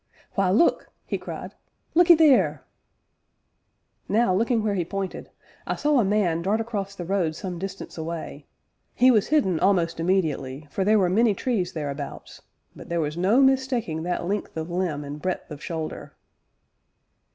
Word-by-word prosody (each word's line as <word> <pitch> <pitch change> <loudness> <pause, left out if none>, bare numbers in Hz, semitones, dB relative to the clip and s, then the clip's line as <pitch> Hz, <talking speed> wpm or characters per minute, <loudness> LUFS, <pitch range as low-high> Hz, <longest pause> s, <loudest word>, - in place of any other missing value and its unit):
"Why, 195 -2 +1
look!" 215 - +2 0.2
he - - -3
cried - - -7 0.4
"look 350 +2 +4
'ee 340 - +10
theer!" 310 -4 +4 1.5
Now, 220 -3 +3
looking 225 +3 +1
where 210 -2 0
he 185 -3 0
pointed, 195 +2 -5 0.4
I - - -1
saw 295 -2 +2
a - - +4
man 190 -5 +1
dart 200 +5 +1
across 205 -4 -4
the 175 - -6
road 175 -4 0
some 180 +1 -5
distance 190 -2 -7
away; 160 -3 -6 0.5
he 255 +2 +6
was 215 -5 +3
hidden 225 - +2
almost 175 -4 +2
immediately, 155 -6 -1
for 195 - -1
there 215 +3 +4
were 190 -3 +3
many 210 +3 +3
trees 200 -8 -1
thereabouts, 145 -2 -6 0.3
but - - -12
there 170 0 0
was 150 -1 -2
no 195 +9 +3
mistaking 260 -11 +1
that 175 +1 -2
length 200 -2 -3
of 160 +2 -4
limb 170 -5 -1
and 145 +1 -7
breadth 185 -3 -3
of 150 0 -8
shoulder. 160 -2 -5
190 Hz, 165 wpm, -25 LUFS, 165-220 Hz, 1.5 s, ee